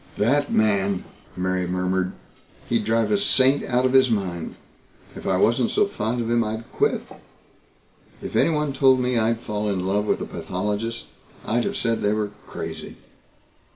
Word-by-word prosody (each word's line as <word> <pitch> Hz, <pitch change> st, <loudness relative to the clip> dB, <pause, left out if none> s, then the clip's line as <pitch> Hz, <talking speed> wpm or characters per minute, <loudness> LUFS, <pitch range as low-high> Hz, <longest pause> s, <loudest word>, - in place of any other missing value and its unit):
"That 145 Hz, +7 st, +2 dB
man!" 100 Hz, -3 st, +2 dB, 0.3 s
Mary 90 Hz, 0 st, -1 dB
murmured. 90 Hz, +1 st, -1 dB, 0.5 s
"He'd 115 Hz, -3 st, 0 dB
drive 110 Hz, -1 st, +1 dB
a 105 Hz, -, +3 dB
saint 135 Hz, +6 st, +4 dB
out 125 Hz, +1 st, +1 dB
of 130 Hz, -, +1 dB
his 130 Hz, -1 st, +6 dB
mind. 95 Hz, -7 st, -2 dB, 0.6 s
If -, -, -7 dB
I 95 Hz, -, +2 dB
wasn't 115 Hz, +5 st, +3 dB
so -, -, +3 dB
fond 120 Hz, -, -2 dB
of 115 Hz, -, -2 dB
him 120 Hz, 0 st, +2 dB
I'd 110 Hz, +2 st, -5 dB
quit. 430 Hz, +1 st, +1 dB, 1.2 s
If -, -, -7 dB
anyone 150 Hz, -3 st, +2 dB
told 135 Hz, -1 st, +4 dB
me 125 Hz, -1 st, +1 dB
I'd 115 Hz, +1 st, +1 dB
fall 105 Hz, -2 st, -2 dB
in 95 Hz, -2 st, -1 dB
love 105 Hz, +2 st, 0 dB
with -, -, +1 dB
a -, -, -3 dB
pathologist, 105 Hz, +5 st, -3 dB, 0.4 s
I'd 120 Hz, +2 st, +1 dB
have -, -, -2 dB
said 115 Hz, -2 st, 0 dB
they 105 Hz, +1 st, +2 dB
were 105 Hz, -1 st, -2 dB, 0.2 s
crazy. -, -, -7 dB
110 Hz, 165 wpm, -23 LUFS, 100-125 Hz, 1.2 s, his